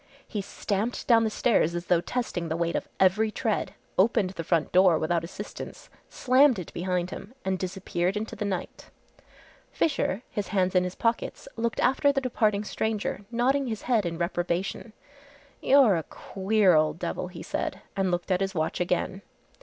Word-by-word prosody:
He 210 - -3
stamped 205 +3 -3
down 230 -2 +5
the - - +1
stairs 210 -7 +2
as 175 0 -3
though 170 -1 +3
testing 175 -5 -3
the 160 - -1
weight 170 0 -1
of - - -2
every 195 +4 +4
tread, 210 -3 -2 0.2
opened 195 -2 +3
the 170 -3 -5
front 165 -1 +1
door 180 -3 +5
without 165 +1 0
assistance, 165 - -8 0.2
slammed 260 -1 +4
it 180 - -7
behind 180 0 -1
him 230 +6 -9
and 190 -1 0
disappeared 185 0 -2
into 220 +1 -4
the - - -4
night. 190 -3 -4 0.8
Fisher, 265 - 0
his 205 - -3
hands 185 -3 +1
in 180 -1 +3
his 180 - -5
pockets, 230 -1 -1
looked 230 -1 -2
after 280 +2 +3
the 275 - 0
departing 215 -5 +1
stranger, 210 -1 -2
nodding 260 +4 +1
his 220 -3 -4
head 225 -7 +2
in 165 -1 -4
reprobation. 175 +5 -2 0.7
"You're 265 -7 +6
a - - -1
queer 195 +3 +1
old 155 0 +3
devil," 180 - -3
he 175 -2 -9
said, 190 - -3
and 195 -1 +1
looked 175 +2 -2
at 185 +1 +2
his 195 0 -1
watch 160 -1 -1
again. 180 +2 -1
195 Hz, 175 wpm, -27 LUFS, 175-225 Hz, 0.8 s, You're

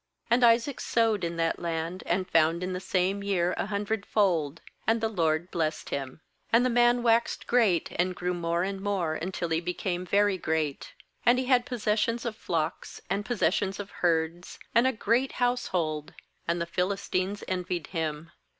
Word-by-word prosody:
^And 240 +2 +4
Isaac 235 +3 +4
sowed 225 -4 +1
in 170 0 -2
that 165 0 0
land, 170 +1 -3
and 185 +1 0
found 165 0 +3
in 185 0 -2
the 180 - -3
same 190 +2 0
year 180 -3 +1
a - - -2
hundredfold; 200 -7 0 0.3
and 225 +1 +3
the 225 - +1
LORD 170 -4 0
blessed 155 -2 -2
Mm. 135 +2 -4 0.3
^And 230 +2 +5
the 255 - +2
man 240 0 +4
waxed 230 0 +2
great, 220 -9 +2
and 180 +1 +1
grew 180 +1 -2
more 170 0 -1
and 195 0 -3
more 195 -6 0
until 170 +1 -3
he 160 0 +1
became 180 +1 -2
very 200 0 +2
great. 155 -4 -2 0.3
14And 240 +1 +6
he 255 - 0
had 250 -1 +3
possessions 230 -1 0
of 230 -2 -2
flocks, 165 -5 -3
and 200 +1 0
possessions 200 -4 0
of 205 -1 -6
herds, 170 0 -1 0.2
and 235 +2 +5
a - - +3
great 245 +2 +1
household; 175 - -1 0.3
and 170 +1 0
the 170 - -1
Philistines 185 +2 -1
envied 180 -3 -2
him. 160 -1 -3
185 Hz, 170 wpm, -28 LUFS, 170-220 Hz, 0.3 s, 14And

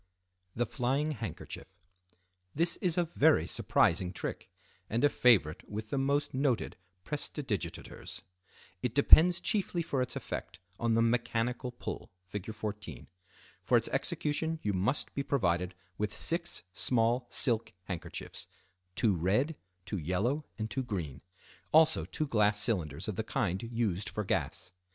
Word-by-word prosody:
The 120 - +1
Flying 135 +6 0
Handkerchief.—This 90 - -4
is 180 -2 +1
a 175 - +4
very 155 - +3
surprising 90 +1 +2
trick, 90 - -5 0.4
and 115 +4 0
a 145 - +6
favorite 100 - +3
with 110 +1 -6
the 140 - 0
most 140 +2 0
noted 130 -3 0 0.3
prestidigitateurs. 140 - -4 0.6
It 125 -1 -2
depends 170 +5 +7
chiefly 185 -4 0
for 140 -5 -1
its 125 - -3
effect 90 +3 -5 0.2
on 115 -1 +2
the 115 - +4
"Mechanical 120 +1 0
Pull" 120 - -6 0.2
(Fig. 100 +2 -5
14). 105 - -6 0.6
For - - +3
its - - -1
execution 160 +2 -1
you 105 - 0
must 100 +10 0
be 140 - -1
provided 90 -10 0 0.2
with 105 0 0
six 170 +1 +1
small 120 +3 +1
silk 115 -4 +3
handkerchiefs 90 -3 -6 0.5
(two 105 0 +3
red, 105 - +1 0.3
two 95 0 -3
yellow, 105 - -1
and 110 - -2
two 130 - -2
green), 85 - -4 0.5
also 160 0 +5
two 155 - -3
glass 105 -6 +3
cylinders 85 - +1
of 105 - -3
the 110 - 0
kind 100 - -1
used 105 -4 -1
for 105 - -3
gas. 90 - -2
115 Hz, 135 wpm, -31 LUFS, 95-140 Hz, 0.6 s, depends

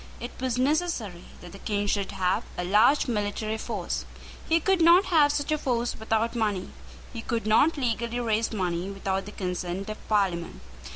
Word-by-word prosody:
It 240 - -6
was 255 -2 -1
necessary 260 - -1 0.2
that 175 - -10
the 195 - -11
King 205 -1 -1
should 200 -1 0
have 185 -1 0
a 180 - -1
large 215 +12 +4
military 215 -1 -2
force. 210 -7 -3 0.5
He 330 +1 +4
could 380 +2 +2
not 345 +4 +7
have 305 -5 +4
such 290 0 -2
a 305 - +1
force 240 -3 -1
without 225 +1 -1
money. 205 -5 -1 0.4
He 230 - -5
could 230 -2 -2
not 285 +9 +4
legally 235 -2 -1
raise 225 -1 0
money 180 -3 -2
without 195 0 -3
the - - -7
consent 180 +1 -4
of 215 - -10
Parliament. 190 -5 0
220 Hz, 175 wpm, -27 LUFS, 195-255 Hz, 0.5 s, not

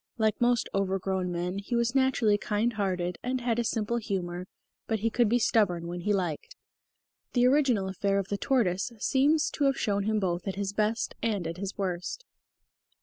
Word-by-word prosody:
Like 220 -1 +1
most 240 -1 +3
over 195 -1 +1
grown 190 -1 -2
men 175 +2 -2
he 205 +4 -3
was 235 0 +1
naturally 260 -6 +3
kind 210 +3 0
hearted 185 -4 -2
and 255 +1 -1
had 240 -1 0
a - - +2
simple 225 +1 -1
humour, 185 -5 -3 0.4
but 220 -3 -1
he 230 +1 +1
could 240 -2 +3
be 240 - +4
stubborn 200 -7 +2
when 175 +1 -5
he 210 - 0
liked. 190 - -2 0.8
The 245 -1 +4
original 255 -7 +3
affair 195 +1 0
of 195 -1 -2
the 200 - -1
tortoise 220 -4 +1
seems 290 +7 +2
to 290 - 0
have 275 -1 +2
shown 200 -2 0
him 215 0 +1
both 175 -1 -2
at 195 - -2
his 200 0 -3
best 215 +2 0
and 205 -6 -1
at 165 +1 -4
his 200 +1 -5
worst. 185 - -3
205 Hz, 195 wpm, -28 LUFS, 190-235 Hz, 0.8 s, be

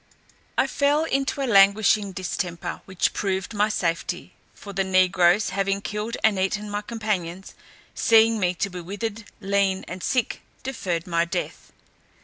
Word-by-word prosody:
I - - +4
fell 290 +2 +2
into 275 -2 -1
a - - +1
languishing 200 -1 +4
distemper, 180 -2 -4
which 190 -2 0
proved 190 +1 -2
my 210 +1 +2
safety; 170 -5 -2 0.2
for 200 - -10
the 195 0 +1
negroes, 185 +1 +3
having 195 0 0
killed 210 +3 -4
and 210 -3 +3
eaten 205 +2 -1
my 205 0 -2
companions, 200 -5 -4 0.4
seeing 225 0 +4
me 180 -2 +1
to 200 +3 -1
be 180 0 -6
withered, 205 +4 -5 0.2
lean, 195 -1 +1
and 180 +1 -7
sick, 250 +1 -1 0.2
deferred 185 -10 -3
my 170 -2 +1
death. 170 - -5
200 Hz, 145 wpm, -24 LUFS, 185-215 Hz, 0.4 s, I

